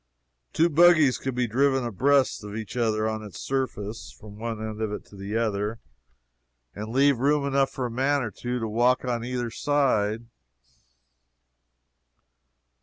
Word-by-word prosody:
Two 165 Hz, -, +3 dB
buggies 155 Hz, -5 st, +5 dB
could 130 Hz, -2 st, -4 dB
be 125 Hz, 0 st, +1 dB
driven 135 Hz, +2 st, +1 dB
abreast 130 Hz, +3 st, +2 dB
of 105 Hz, 0 st, -7 dB
each 110 Hz, -1 st, -6 dB
other, 110 Hz, -3 st, +1 dB
on 110 Hz, 0 st, -3 dB
its 105 Hz, -3 st, -10 dB
surface, 115 Hz, -5 st, -3 dB
from 105 Hz, -1 st, -13 dB
one 115 Hz, -1 st, -4 dB
end 110 Hz, 0 st, -5 dB
of 110 Hz, -2 st, -1 dB
it 105 Hz, -, -6 dB
to -, -, -16 dB
the 100 Hz, +3 st, -4 dB
other, 105 Hz, -1 st, -1 dB, 1.0 s
and 105 Hz, +1 st, -6 dB
leave 135 Hz, +1 st, +3 dB
room 145 Hz, +2 st, +2 dB
enough 140 Hz, -1 st, +2 dB
for 130 Hz, -, -4 dB
a 120 Hz, -, -4 dB
man 135 Hz, +3 st, +1 dB
or 110 Hz, -, -4 dB
two 125 Hz, +3 st, -4 dB
to 115 Hz, -2 st, -2 dB
walk 120 Hz, +4 st, +2 dB
on 120 Hz, -2 st, -2 dB
either 120 Hz, -1 st, -3 dB
side. 120 Hz, -6 st, +1 dB
120 Hz, 160 wpm, -26 LUFS, 110-135 Hz, 1.0 s, buggies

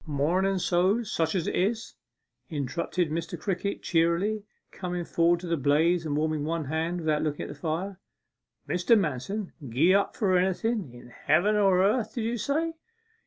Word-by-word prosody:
' -, -, -22 dB, 0.2 s
Mornen 190 Hz, +5 st, +2 dB
so's 190 Hz, +5 st, +1 dB
such 160 Hz, +2 st, 0 dB
as 175 Hz, -3 st, 0 dB
it -, -, -2 dB
is!' 220 Hz, +5 st, -1 dB, 0.6 s
interrupted 160 Hz, +3 st, -2 dB
Mr. 165 Hz, +1 st, -3 dB
Crickett 200 Hz, 0 st, -3 dB
cheerily, 170 Hz, +6 st, +1 dB, 0.3 s
coming 180 Hz, -2 st, -4 dB
forward 170 Hz, +1 st, +2 dB
to 180 Hz, -, -6 dB
the 170 Hz, 0 st, 0 dB
blaze 160 Hz, +5 st, +2 dB
and 145 Hz, -1 st, -1 dB
warming 155 Hz, -1 st, 0 dB
one 160 Hz, 0 st, -2 dB
hand 165 Hz, +4 st, -2 dB
without 155 Hz, -2 st, +1 dB
looking 150 Hz, -2 st, -2 dB
at -, -, -7 dB
the -, -, -6 dB
fire. 180 Hz, +4 st, -3 dB, 0.7 s
'Mr. 180 Hz, +6 st, +3 dB
Manston 185 Hz, -, -3 dB, 0.2 s
gie 155 Hz, +11 st, +4 dB
up 200 Hz, 0 st, +2 dB
for 190 Hz, -4 st, +2 dB
anything 190 Hz, -, -1 dB
in 120 Hz, 0 st, -13 dB
heaven 170 Hz, -, +2 dB
or 195 Hz, -3 st, +4 dB
earth, 215 Hz, +2 st, +1 dB
did 235 Hz, -, -2 dB
you 235 Hz, +1 st, -1 dB
say? 315 Hz, +8 st, 0 dB
175 Hz, 170 wpm, -27 LUFS, 160-200 Hz, 0.7 s, gie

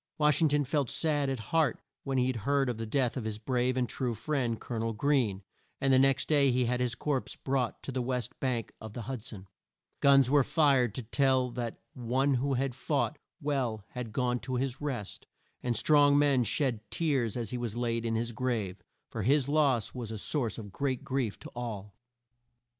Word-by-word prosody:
Wash 150 Hz, 0 st, +3 dB
ing 160 Hz, -, +6 dB
ton 145 Hz, 0 st, +2 dB
felt 140 Hz, -2 st, 0 dB
sad 145 Hz, -4 st, 0 dB
at 135 Hz, -, -1 dB, 0.2 s
heart 160 Hz, -3 st, +3 dB, 0.2 s
when 135 Hz, -1 st, -1 dB
he 130 Hz, 0 st, +2 dB
heard 135 Hz, +3 st, 0 dB
of 115 Hz, -2 st, -3 dB
the 115 Hz, -, -3 dB
death 125 Hz, +1 st, +1 dB
of 130 Hz, -, -3 dB
his 110 Hz, -1 st, -3 dB
brave 125 Hz, +3 st, 0 dB
and 125 Hz, -1 st, +1 dB
true 125 Hz, -2 st, -2 dB
friend, 120 Hz, -2 st, -1 dB
Col 120 Hz, -, -5 dB
o -, -, -1 dB
nel 115 Hz, 0 st, -1 dB
Greene, 110 Hz, -5 st, +1 dB, 0.4 s
and 135 Hz, -1 st, +3 dB
the 130 Hz, -, +6 dB
next 135 Hz, 0 st, +3 dB
day 145 Hz, -3 st, +4 dB
he 125 Hz, 0 st, +2 dB
had 125 Hz, +1 st, 0 dB
his 125 Hz, -1 st, 0 dB
corpse 140 Hz, -4 st, -2 dB
brought 130 Hz, -3 st, -2 dB
to -, -, -4 dB
the 130 Hz, -1 st, -1 dB
west 125 Hz, 0 st, -3 dB
bank 125 Hz, -4 st, -2 dB
of 110 Hz, -1 st, -8 dB
the 120 Hz, -, -5 dB
Hud 130 Hz, 0 st, -5 dB
son. 100 Hz, -5 st, -8 dB, 0.5 s
Guns 135 Hz, -2 st, +6 dB
were 140 Hz, +1 st, +4 dB
fired 135 Hz, -7 st, +3 dB
to 125 Hz, -, -4 dB
tell 130 Hz, +1 st, +2 dB
that 120 Hz, -2 st, -4 dB, 0.2 s
one 130 Hz, +3 st, +1 dB
who 135 Hz, +2 st, +1 dB
had 130 Hz, 0 st, -1 dB
fought 145 Hz, +3 st, -1 dB, 0.2 s
well 130 Hz, -, -1 dB
had 125 Hz, -3 st, -6 dB
gone 125 Hz, +1 st, 0 dB
to 130 Hz, +2 st, -4 dB
his 130 Hz, +1 st, -2 dB
rest, 125 Hz, -9 st, -5 dB, 0.3 s
and 120 Hz, -2 st, 0 dB
strong 145 Hz, +1 st, +5 dB
men 140 Hz, -3 st, +4 dB
shed 120 Hz, +1 st, 0 dB
tears 135 Hz, -9 st, 0 dB
as 115 Hz, -4 st, -3 dB
he 125 Hz, -, -2 dB
was 120 Hz, -2 st, -3 dB
laid 115 Hz, -1 st, -1 dB
in 115 Hz, -1 st, -1 dB
his 115 Hz, +1 st, -1 dB
grave, 110 Hz, -6 st, -2 dB, 0.3 s
for 110 Hz, -, -3 dB
his 135 Hz, +5 st, +3 dB
loss 140 Hz, -7 st, +2 dB
was 120 Hz, -4 st, -5 dB
a 110 Hz, -, -4 dB
source 120 Hz, +1 st, 0 dB
of 105 Hz, -3 st, -8 dB
great 130 Hz, +2 st, -2 dB
grief 130 Hz, -6 st, -1 dB
to -, -, -11 dB
all. 105 Hz, -5 st, -5 dB
125 Hz, 210 wpm, -30 LUFS, 115-140 Hz, 0.5 s, ing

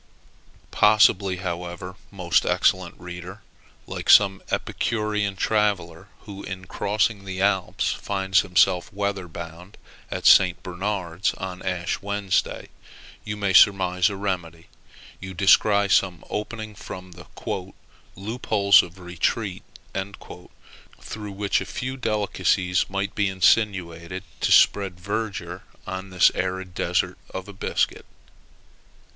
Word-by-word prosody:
Possibly, 105 Hz, -3 st, +4 dB
however, 90 Hz, 0 st, -5 dB
most 90 Hz, -4 st, +1 dB
excellent 95 Hz, -2 st, +1 dB
reader, 90 Hz, +3 st, -9 dB, 0.4 s
like -, -, -6 dB
some 95 Hz, -2 st, +6 dB
epicurean 105 Hz, -3 st, -1 dB
traveller, 95 Hz, -6 st, 0 dB
who, 100 Hz, -1 st, -9 dB
in 95 Hz, -1 st, -7 dB
crossing 105 Hz, +2 st, -1 dB
the 95 Hz, -1 st, -6 dB
Alps, 95 Hz, -2 st, +1 dB
finds 95 Hz, -1 st, 0 dB
himself 90 Hz, -1 st, +2 dB
weather 100 Hz, -2 st, -3 dB
bound 85 Hz, +3 st, -10 dB, 0.3 s
at -, -, -5 dB
St. 90 Hz, -2 st, +6 dB
Bernard's 95 Hz, -1 st, -2 dB
on 95 Hz, -1 st, -6 dB
Ash 90 Hz, -2 st, -2 dB
Wednesday, 100 Hz, -1 st, -1 dB, 0.5 s
you 105 Hz, -3 st, -2 dB
surmise 90 Hz, -1 st, +5 dB
a 100 Hz, -, -5 dB
remedy: 90 Hz, -5 st, -4 dB, 0.5 s
you 95 Hz, -1 st, -8 dB
descry 100 Hz, +2 st, +4 dB
some 95 Hz, -4 st, +1 dB
opening 110 Hz, 0 st, -5 dB
from 95 Hz, -2 st, -9 dB
"the 90 Hz, 0 st, -13 dB, 0.9 s
loopholes 100 Hz, -1 st, +3 dB
of 90 Hz, +1 st, -11 dB
retreat," 90 Hz, +3 st, -2 dB, 1.4 s
through 105 Hz, -2 st, -7 dB
which 100 Hz, 0 st, 0 dB
a -, -, -4 dB
few 130 Hz, +7 st, -4 dB
delicacies 100 Hz, -5 st, 0 dB
might 100 Hz, +1 st, -2 dB
be 105 Hz, -2 st, +1 dB
insinuated 95 Hz, -2 st, +1 dB, 0.2 s
to -, -, 0 dB
spread 95 Hz, -3 st, +4 dB
verdure 95 Hz, -2 st, -4 dB, 0.2 s
on 95 Hz, +1 st, -6 dB
this 90 Hz, -1 st, +5 dB
arid 95 Hz, 0 st, -3 dB
desert 90 Hz, +1 st, -1 dB, 0.2 s
of 95 Hz, -1 st, -4 dB
biscuit. -, -, -1 dB
95 Hz, 110 wpm, -24 LUFS, 90-100 Hz, 1.4 s, some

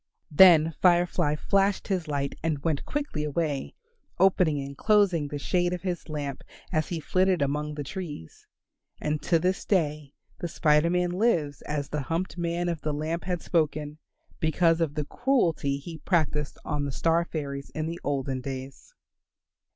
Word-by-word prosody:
Then 165 Hz, -1 st, +7 dB
Fire 175 Hz, -1 st, +5 dB
fly 150 Hz, -3 st, 0 dB
flashed 195 Hz, +4 st, +1 dB
his 185 Hz, -5 st, -1 dB
light 140 Hz, -2 st, -2 dB
and 150 Hz, -3 st, -2 dB
went 160 Hz, -4 st, -1 dB
quickly 290 Hz, -, -2 dB
away, 150 Hz, -2 st, -2 dB, 0.4 s
opening 180 Hz, -5 st, +3 dB
and 140 Hz, 0 st, -6 dB
closing 200 Hz, -6 st, +3 dB
the 145 Hz, -, -5 dB
shade 175 Hz, +4 st, 0 dB
of 180 Hz, -, -5 dB
his 180 Hz, -3 st, -3 dB
lamp 145 Hz, -3 st, -4 dB, 0.3 s
as 155 Hz, -3 st, 0 dB
he 170 Hz, -, -3 dB
flitted 185 Hz, +1 st, +2 dB
among 150 Hz, +2 st, -2 dB
the 145 Hz, -, -4 dB
trees. 150 Hz, -, -8 dB, 0.5 s
And 150 Hz, 0 st, -1 dB
to 170 Hz, -, +2 dB
this 185 Hz, +4 st, 0 dB
day 150 Hz, -6 st, 0 dB, 0.2 s
the 175 Hz, -, -2 dB
Spider 155 Hz, 0 st, +3 dB
Man 180 Hz, 0 st, +1 dB
lives 175 Hz, -8 st, +1 dB
as 145 Hz, -2 st, -2 dB
the 150 Hz, -, -2 dB
humped 165 Hz, +7 st, -2 dB
man 170 Hz, 0 st, -1 dB
of 170 Hz, -3 st, -2 dB
the 150 Hz, -, -2 dB
lamp 160 Hz, +3 st, -3 dB
had 180 Hz, -2 st, -2 dB
spoken, 155 Hz, -2 st, -1 dB, 0.4 s
because 165 Hz, +1 st, +2 dB
of 150 Hz, -3 st, 0 dB
the 150 Hz, -1 st, -2 dB
cruelty 170 Hz, -, +1 dB
he 160 Hz, +3 st, -8 dB
practised 150 Hz, -5 st, 0 dB
on 150 Hz, -2 st, -1 dB
the 140 Hz, -, -3 dB
star 165 Hz, +5 st, +2 dB
fairies 140 Hz, -4 st, -5 dB
in 155 Hz, -, -4 dB
the 165 Hz, +2 st, -4 dB
olden 135 Hz, -2 st, -2 dB
days. 135 Hz, -, -8 dB
160 Hz, 165 wpm, -27 LUFS, 145-175 Hz, 0.5 s, Then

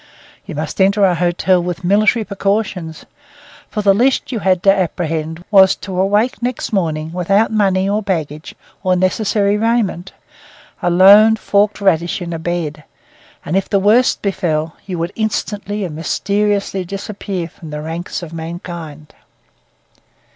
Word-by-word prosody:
You -, -, -6 dB
must 155 Hz, +5 st, -3 dB
enter 200 Hz, +1 st, +4 dB
a 185 Hz, -, +3 dB
hotel 175 Hz, +1 st, +1 dB
with 175 Hz, +1 st, -4 dB
military 210 Hz, +4 st, +2 dB
precautions; 195 Hz, -5 st, -2 dB, 0.6 s
for 210 Hz, -, -3 dB
the 200 Hz, -1 st, +5 dB
least 255 Hz, +8 st, +1 dB
you 235 Hz, -, -2 dB
had 185 Hz, -3 st, +1 dB
to 195 Hz, -, +6 dB
apprehend 165 Hz, -2 st, -3 dB
was 190 Hz, -2 st, +6 dB
to 185 Hz, -1 st, -3 dB
awake 210 Hz, +7 st, +1 dB
next 245 Hz, -1 st, -3 dB
morning 160 Hz, -4 st, -1 dB
without 195 Hz, +5 st, +1 dB
money 195 Hz, -3 st, +1 dB
or 205 Hz, +2 st, 0 dB
baggage, 160 Hz, -6 st, -4 dB, 0.3 s
or 185 Hz, -1 st, +2 dB
necessary 200 Hz, +2 st, +1 dB
raiment, 215 Hz, -5 st, 0 dB, 0.7 s
a 175 Hz, -, +1 dB
lone 200 Hz, +5 st, +7 dB
forked 205 Hz, -1 st, +1 dB
radish 175 Hz, -1 st, +1 dB
in 175 Hz, -2 st, -5 dB
a 165 Hz, -, -4 dB
bed; 160 Hz, -3 st, -3 dB, 0.6 s
and 160 Hz, -, -2 dB
if 195 Hz, -, 0 dB
the 200 Hz, -, +2 dB
worst 215 Hz, +6 st, +3 dB
befell, 160 Hz, -5 st, -1 dB
you 185 Hz, -3 st, -4 dB
would 170 Hz, +3 st, -3 dB
instantly 210 Hz, -1 st, -3 dB
and 160 Hz, -4 st, -6 dB
mysteriously 200 Hz, +4 st, -1 dB
disappear 195 Hz, -1 st, -5 dB
from 160 Hz, -1 st, -13 dB
the 150 Hz, 0 st, -5 dB
ranks 170 Hz, +3 st, -5 dB
of 165 Hz, -1 st, -9 dB
mankind. 165 Hz, -2 st, -8 dB
190 Hz, 145 wpm, -17 LUFS, 170-205 Hz, 0.7 s, lone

